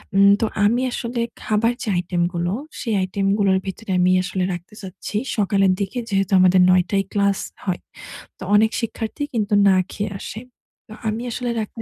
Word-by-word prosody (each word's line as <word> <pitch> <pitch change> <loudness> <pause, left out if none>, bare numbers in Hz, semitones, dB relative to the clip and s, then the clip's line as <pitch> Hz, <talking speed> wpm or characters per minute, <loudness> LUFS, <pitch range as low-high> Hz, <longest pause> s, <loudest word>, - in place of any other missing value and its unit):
উম 200 0 +7
তো - - +3 0.2
আমি 235 +4 +2
আসলে 235 0 -3 0.2
খাবার 225 +3 +1
যে 225 - -3
আইটেমগুলো, 175 0 -1 0.3
সেই 225 -4 -1
আইটেমগুলোর 195 +1 +1
ভিতরে 195 +2 -5
আমি 180 0 +4
আসলে 185 0 -2
রাখতে 175 +3 -9
চাচ্ছি 190 +2 -6 0.2
সকালের 195 -2 +3
দিকে 200 +6 -2
যেহেতু 195 -1 0
আমাদের 185 0 +5
৯ঃ০০ 185 0 +5
টায় 195 -1 +1
ক্লাস 200 -1 +2 0.3
হয়। 185 -3 -2 0.6
তো - - -9
অনেক 220 +1 +4
শিক্ষার্থী 230 +4 -4
কিন্তু 215 -2 -1 0.2
না 190 - +5 0.2
খেয়ে 205 0 -3
আসে। 220 - -7 0.5
তো - - -9 0.2
আমি 220 +2 -3
আসলে 245 +1 -2
রাখতে 215 +2 -7
200 Hz, 170 wpm, -21 LUFS, 185-220 Hz, 0.6 s, উম